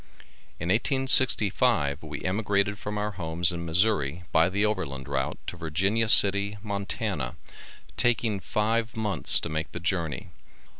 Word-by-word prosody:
In 85 - -4
1865 110 - +3
we 75 -1 -8
emigrated 100 +1 -1
from 105 0 -5
our 105 0 -2
homes 85 -1 0
in 85 -1 -6
Missourri 85 -3 +1
by 80 +2 +3
the 100 +3 0
overland 70 -11 -3
route 65 -1 -3
to 90 - -7
Virginia 95 +7 -1
City, 100 0 +6
Montana, 100 - -4 0.6
taking 115 -3 +1
five 110 +3 -2
months 105 -8 0
to - - -3
make 80 +1 -4
the 90 - -5
journey. 90 0 -3
95 Hz, 135 wpm, -26 LUFS, 80-105 Hz, 0.6 s, City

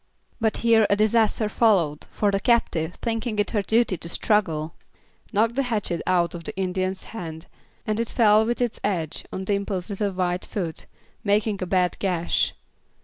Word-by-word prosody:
But 220 -2 +1
here 225 -2 +5
a 200 - +4
disaster 215 +1 +2
followed, 190 -9 +2
for 205 -1 +1
the 195 - +1
captive, 180 -8 +1
thinking 225 -1 -2
it 205 -1 0
her 210 - +1
duty 220 -2 +2
to 170 - -4
struggle, 165 -6 0 0.6
knocked 220 +2 +2
the 275 - +1
hatchet 205 -7 -1
out 175 -2 +2
of 170 -1 -7
the - - -7
Indian's 185 0 -1
hand, 160 -6 -6 0.4
and 215 0 -1
it 230 - 0
fell 215 -2 +4
with 235 +2 -1
its 240 -2 -1
edge 165 -6 -2
on 190 - -4
Dimple's 200 -1 -2
little 200 +1 -1
white 180 0 -1
foot, 170 -6 -5 0.4
making 205 -1 +1
a 185 - -2
bad 180 -1 +1
gash. 175 -3 0
200 Hz, 170 wpm, -24 LUFS, 180-220 Hz, 0.6 s, here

